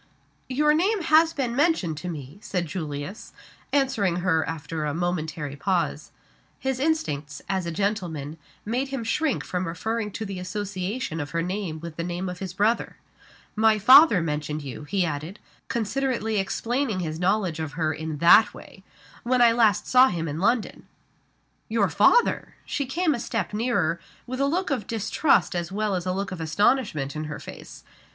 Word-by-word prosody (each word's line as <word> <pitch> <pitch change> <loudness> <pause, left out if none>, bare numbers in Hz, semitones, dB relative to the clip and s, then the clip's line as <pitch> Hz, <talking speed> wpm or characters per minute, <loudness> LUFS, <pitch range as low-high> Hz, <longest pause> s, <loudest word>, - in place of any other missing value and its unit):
"Your 300 +3 +3
name 380 +5 +1
has 320 +1 +5
been 255 -6 -2
mentioned 280 - +2
to 180 +4 -5
me," 150 +1 -8
said 180 -4 -2
Julius, 155 +3 -6 0.4
answering 260 -10 +1
her 160 -3 +3
after 160 0 -4
a 150 0 -2
momentary 160 -4 -2
pause. 180 +3 -1 0.5
His 265 -1 -2
instincts, 150 - -1
as 190 -3 -1
a - - -2
gentleman, 165 -6 -2 0.3
made 245 +6 -1
him 270 -3 -4
shrink 295 +5 0
from 180 0 -3
referring 220 +6 -2
to 220 - -4
the 195 -2 -5
association 190 0 -4
of 145 -1 -4
her 165 - +1
name 180 -3 -3
with 170 -2 -8
the 170 - -2
name 175 +2 -3
of 180 0 -7
his 190 -3 -5
brother. 210 +6 0 0.6
"My 220 0 +4
father 255 - +7
mentioned 150 -1 -3
you," 140 +2 -7
he 185 +4 0
added, 160 +5 -5 0.3
considerately 235 -1 -1
explaining 230 +1 -1
his 160 -1 -4
knowledge 185 -3 +1
of 155 -2 -4
her 160 0 0
in 155 0 -5
that 175 +7 +6
way, 190 - -13 0.4
"when 250 +1 +1
I 240 -1 +7
last 215 -3 +3
saw 255 +1 +6
him 165 -7 -2
in 150 +1 -4
London." 225 +4 0 0.8
"Your - - +2
father!" 485 0 +3
She 280 - -2
came 320 +4 +1
a 240 - -3
step 225 -3 -3
nearer, 215 -7 0 0.3
with 255 +1 -5
a 275 - +3
look 350 +3 -1
of 250 -8 -2
distrust 225 +2 +2
as 175 0 -3
well 210 +1 -1
as 180 -1 -2
a - - +1
look 195 +2 -3
of 185 -3 -5
astonishment 160 - +1
in 155 0 -3
her 150 0 -5
face. - - -11
195 Hz, 175 wpm, -25 LUFS, 160-240 Hz, 0.8 s, father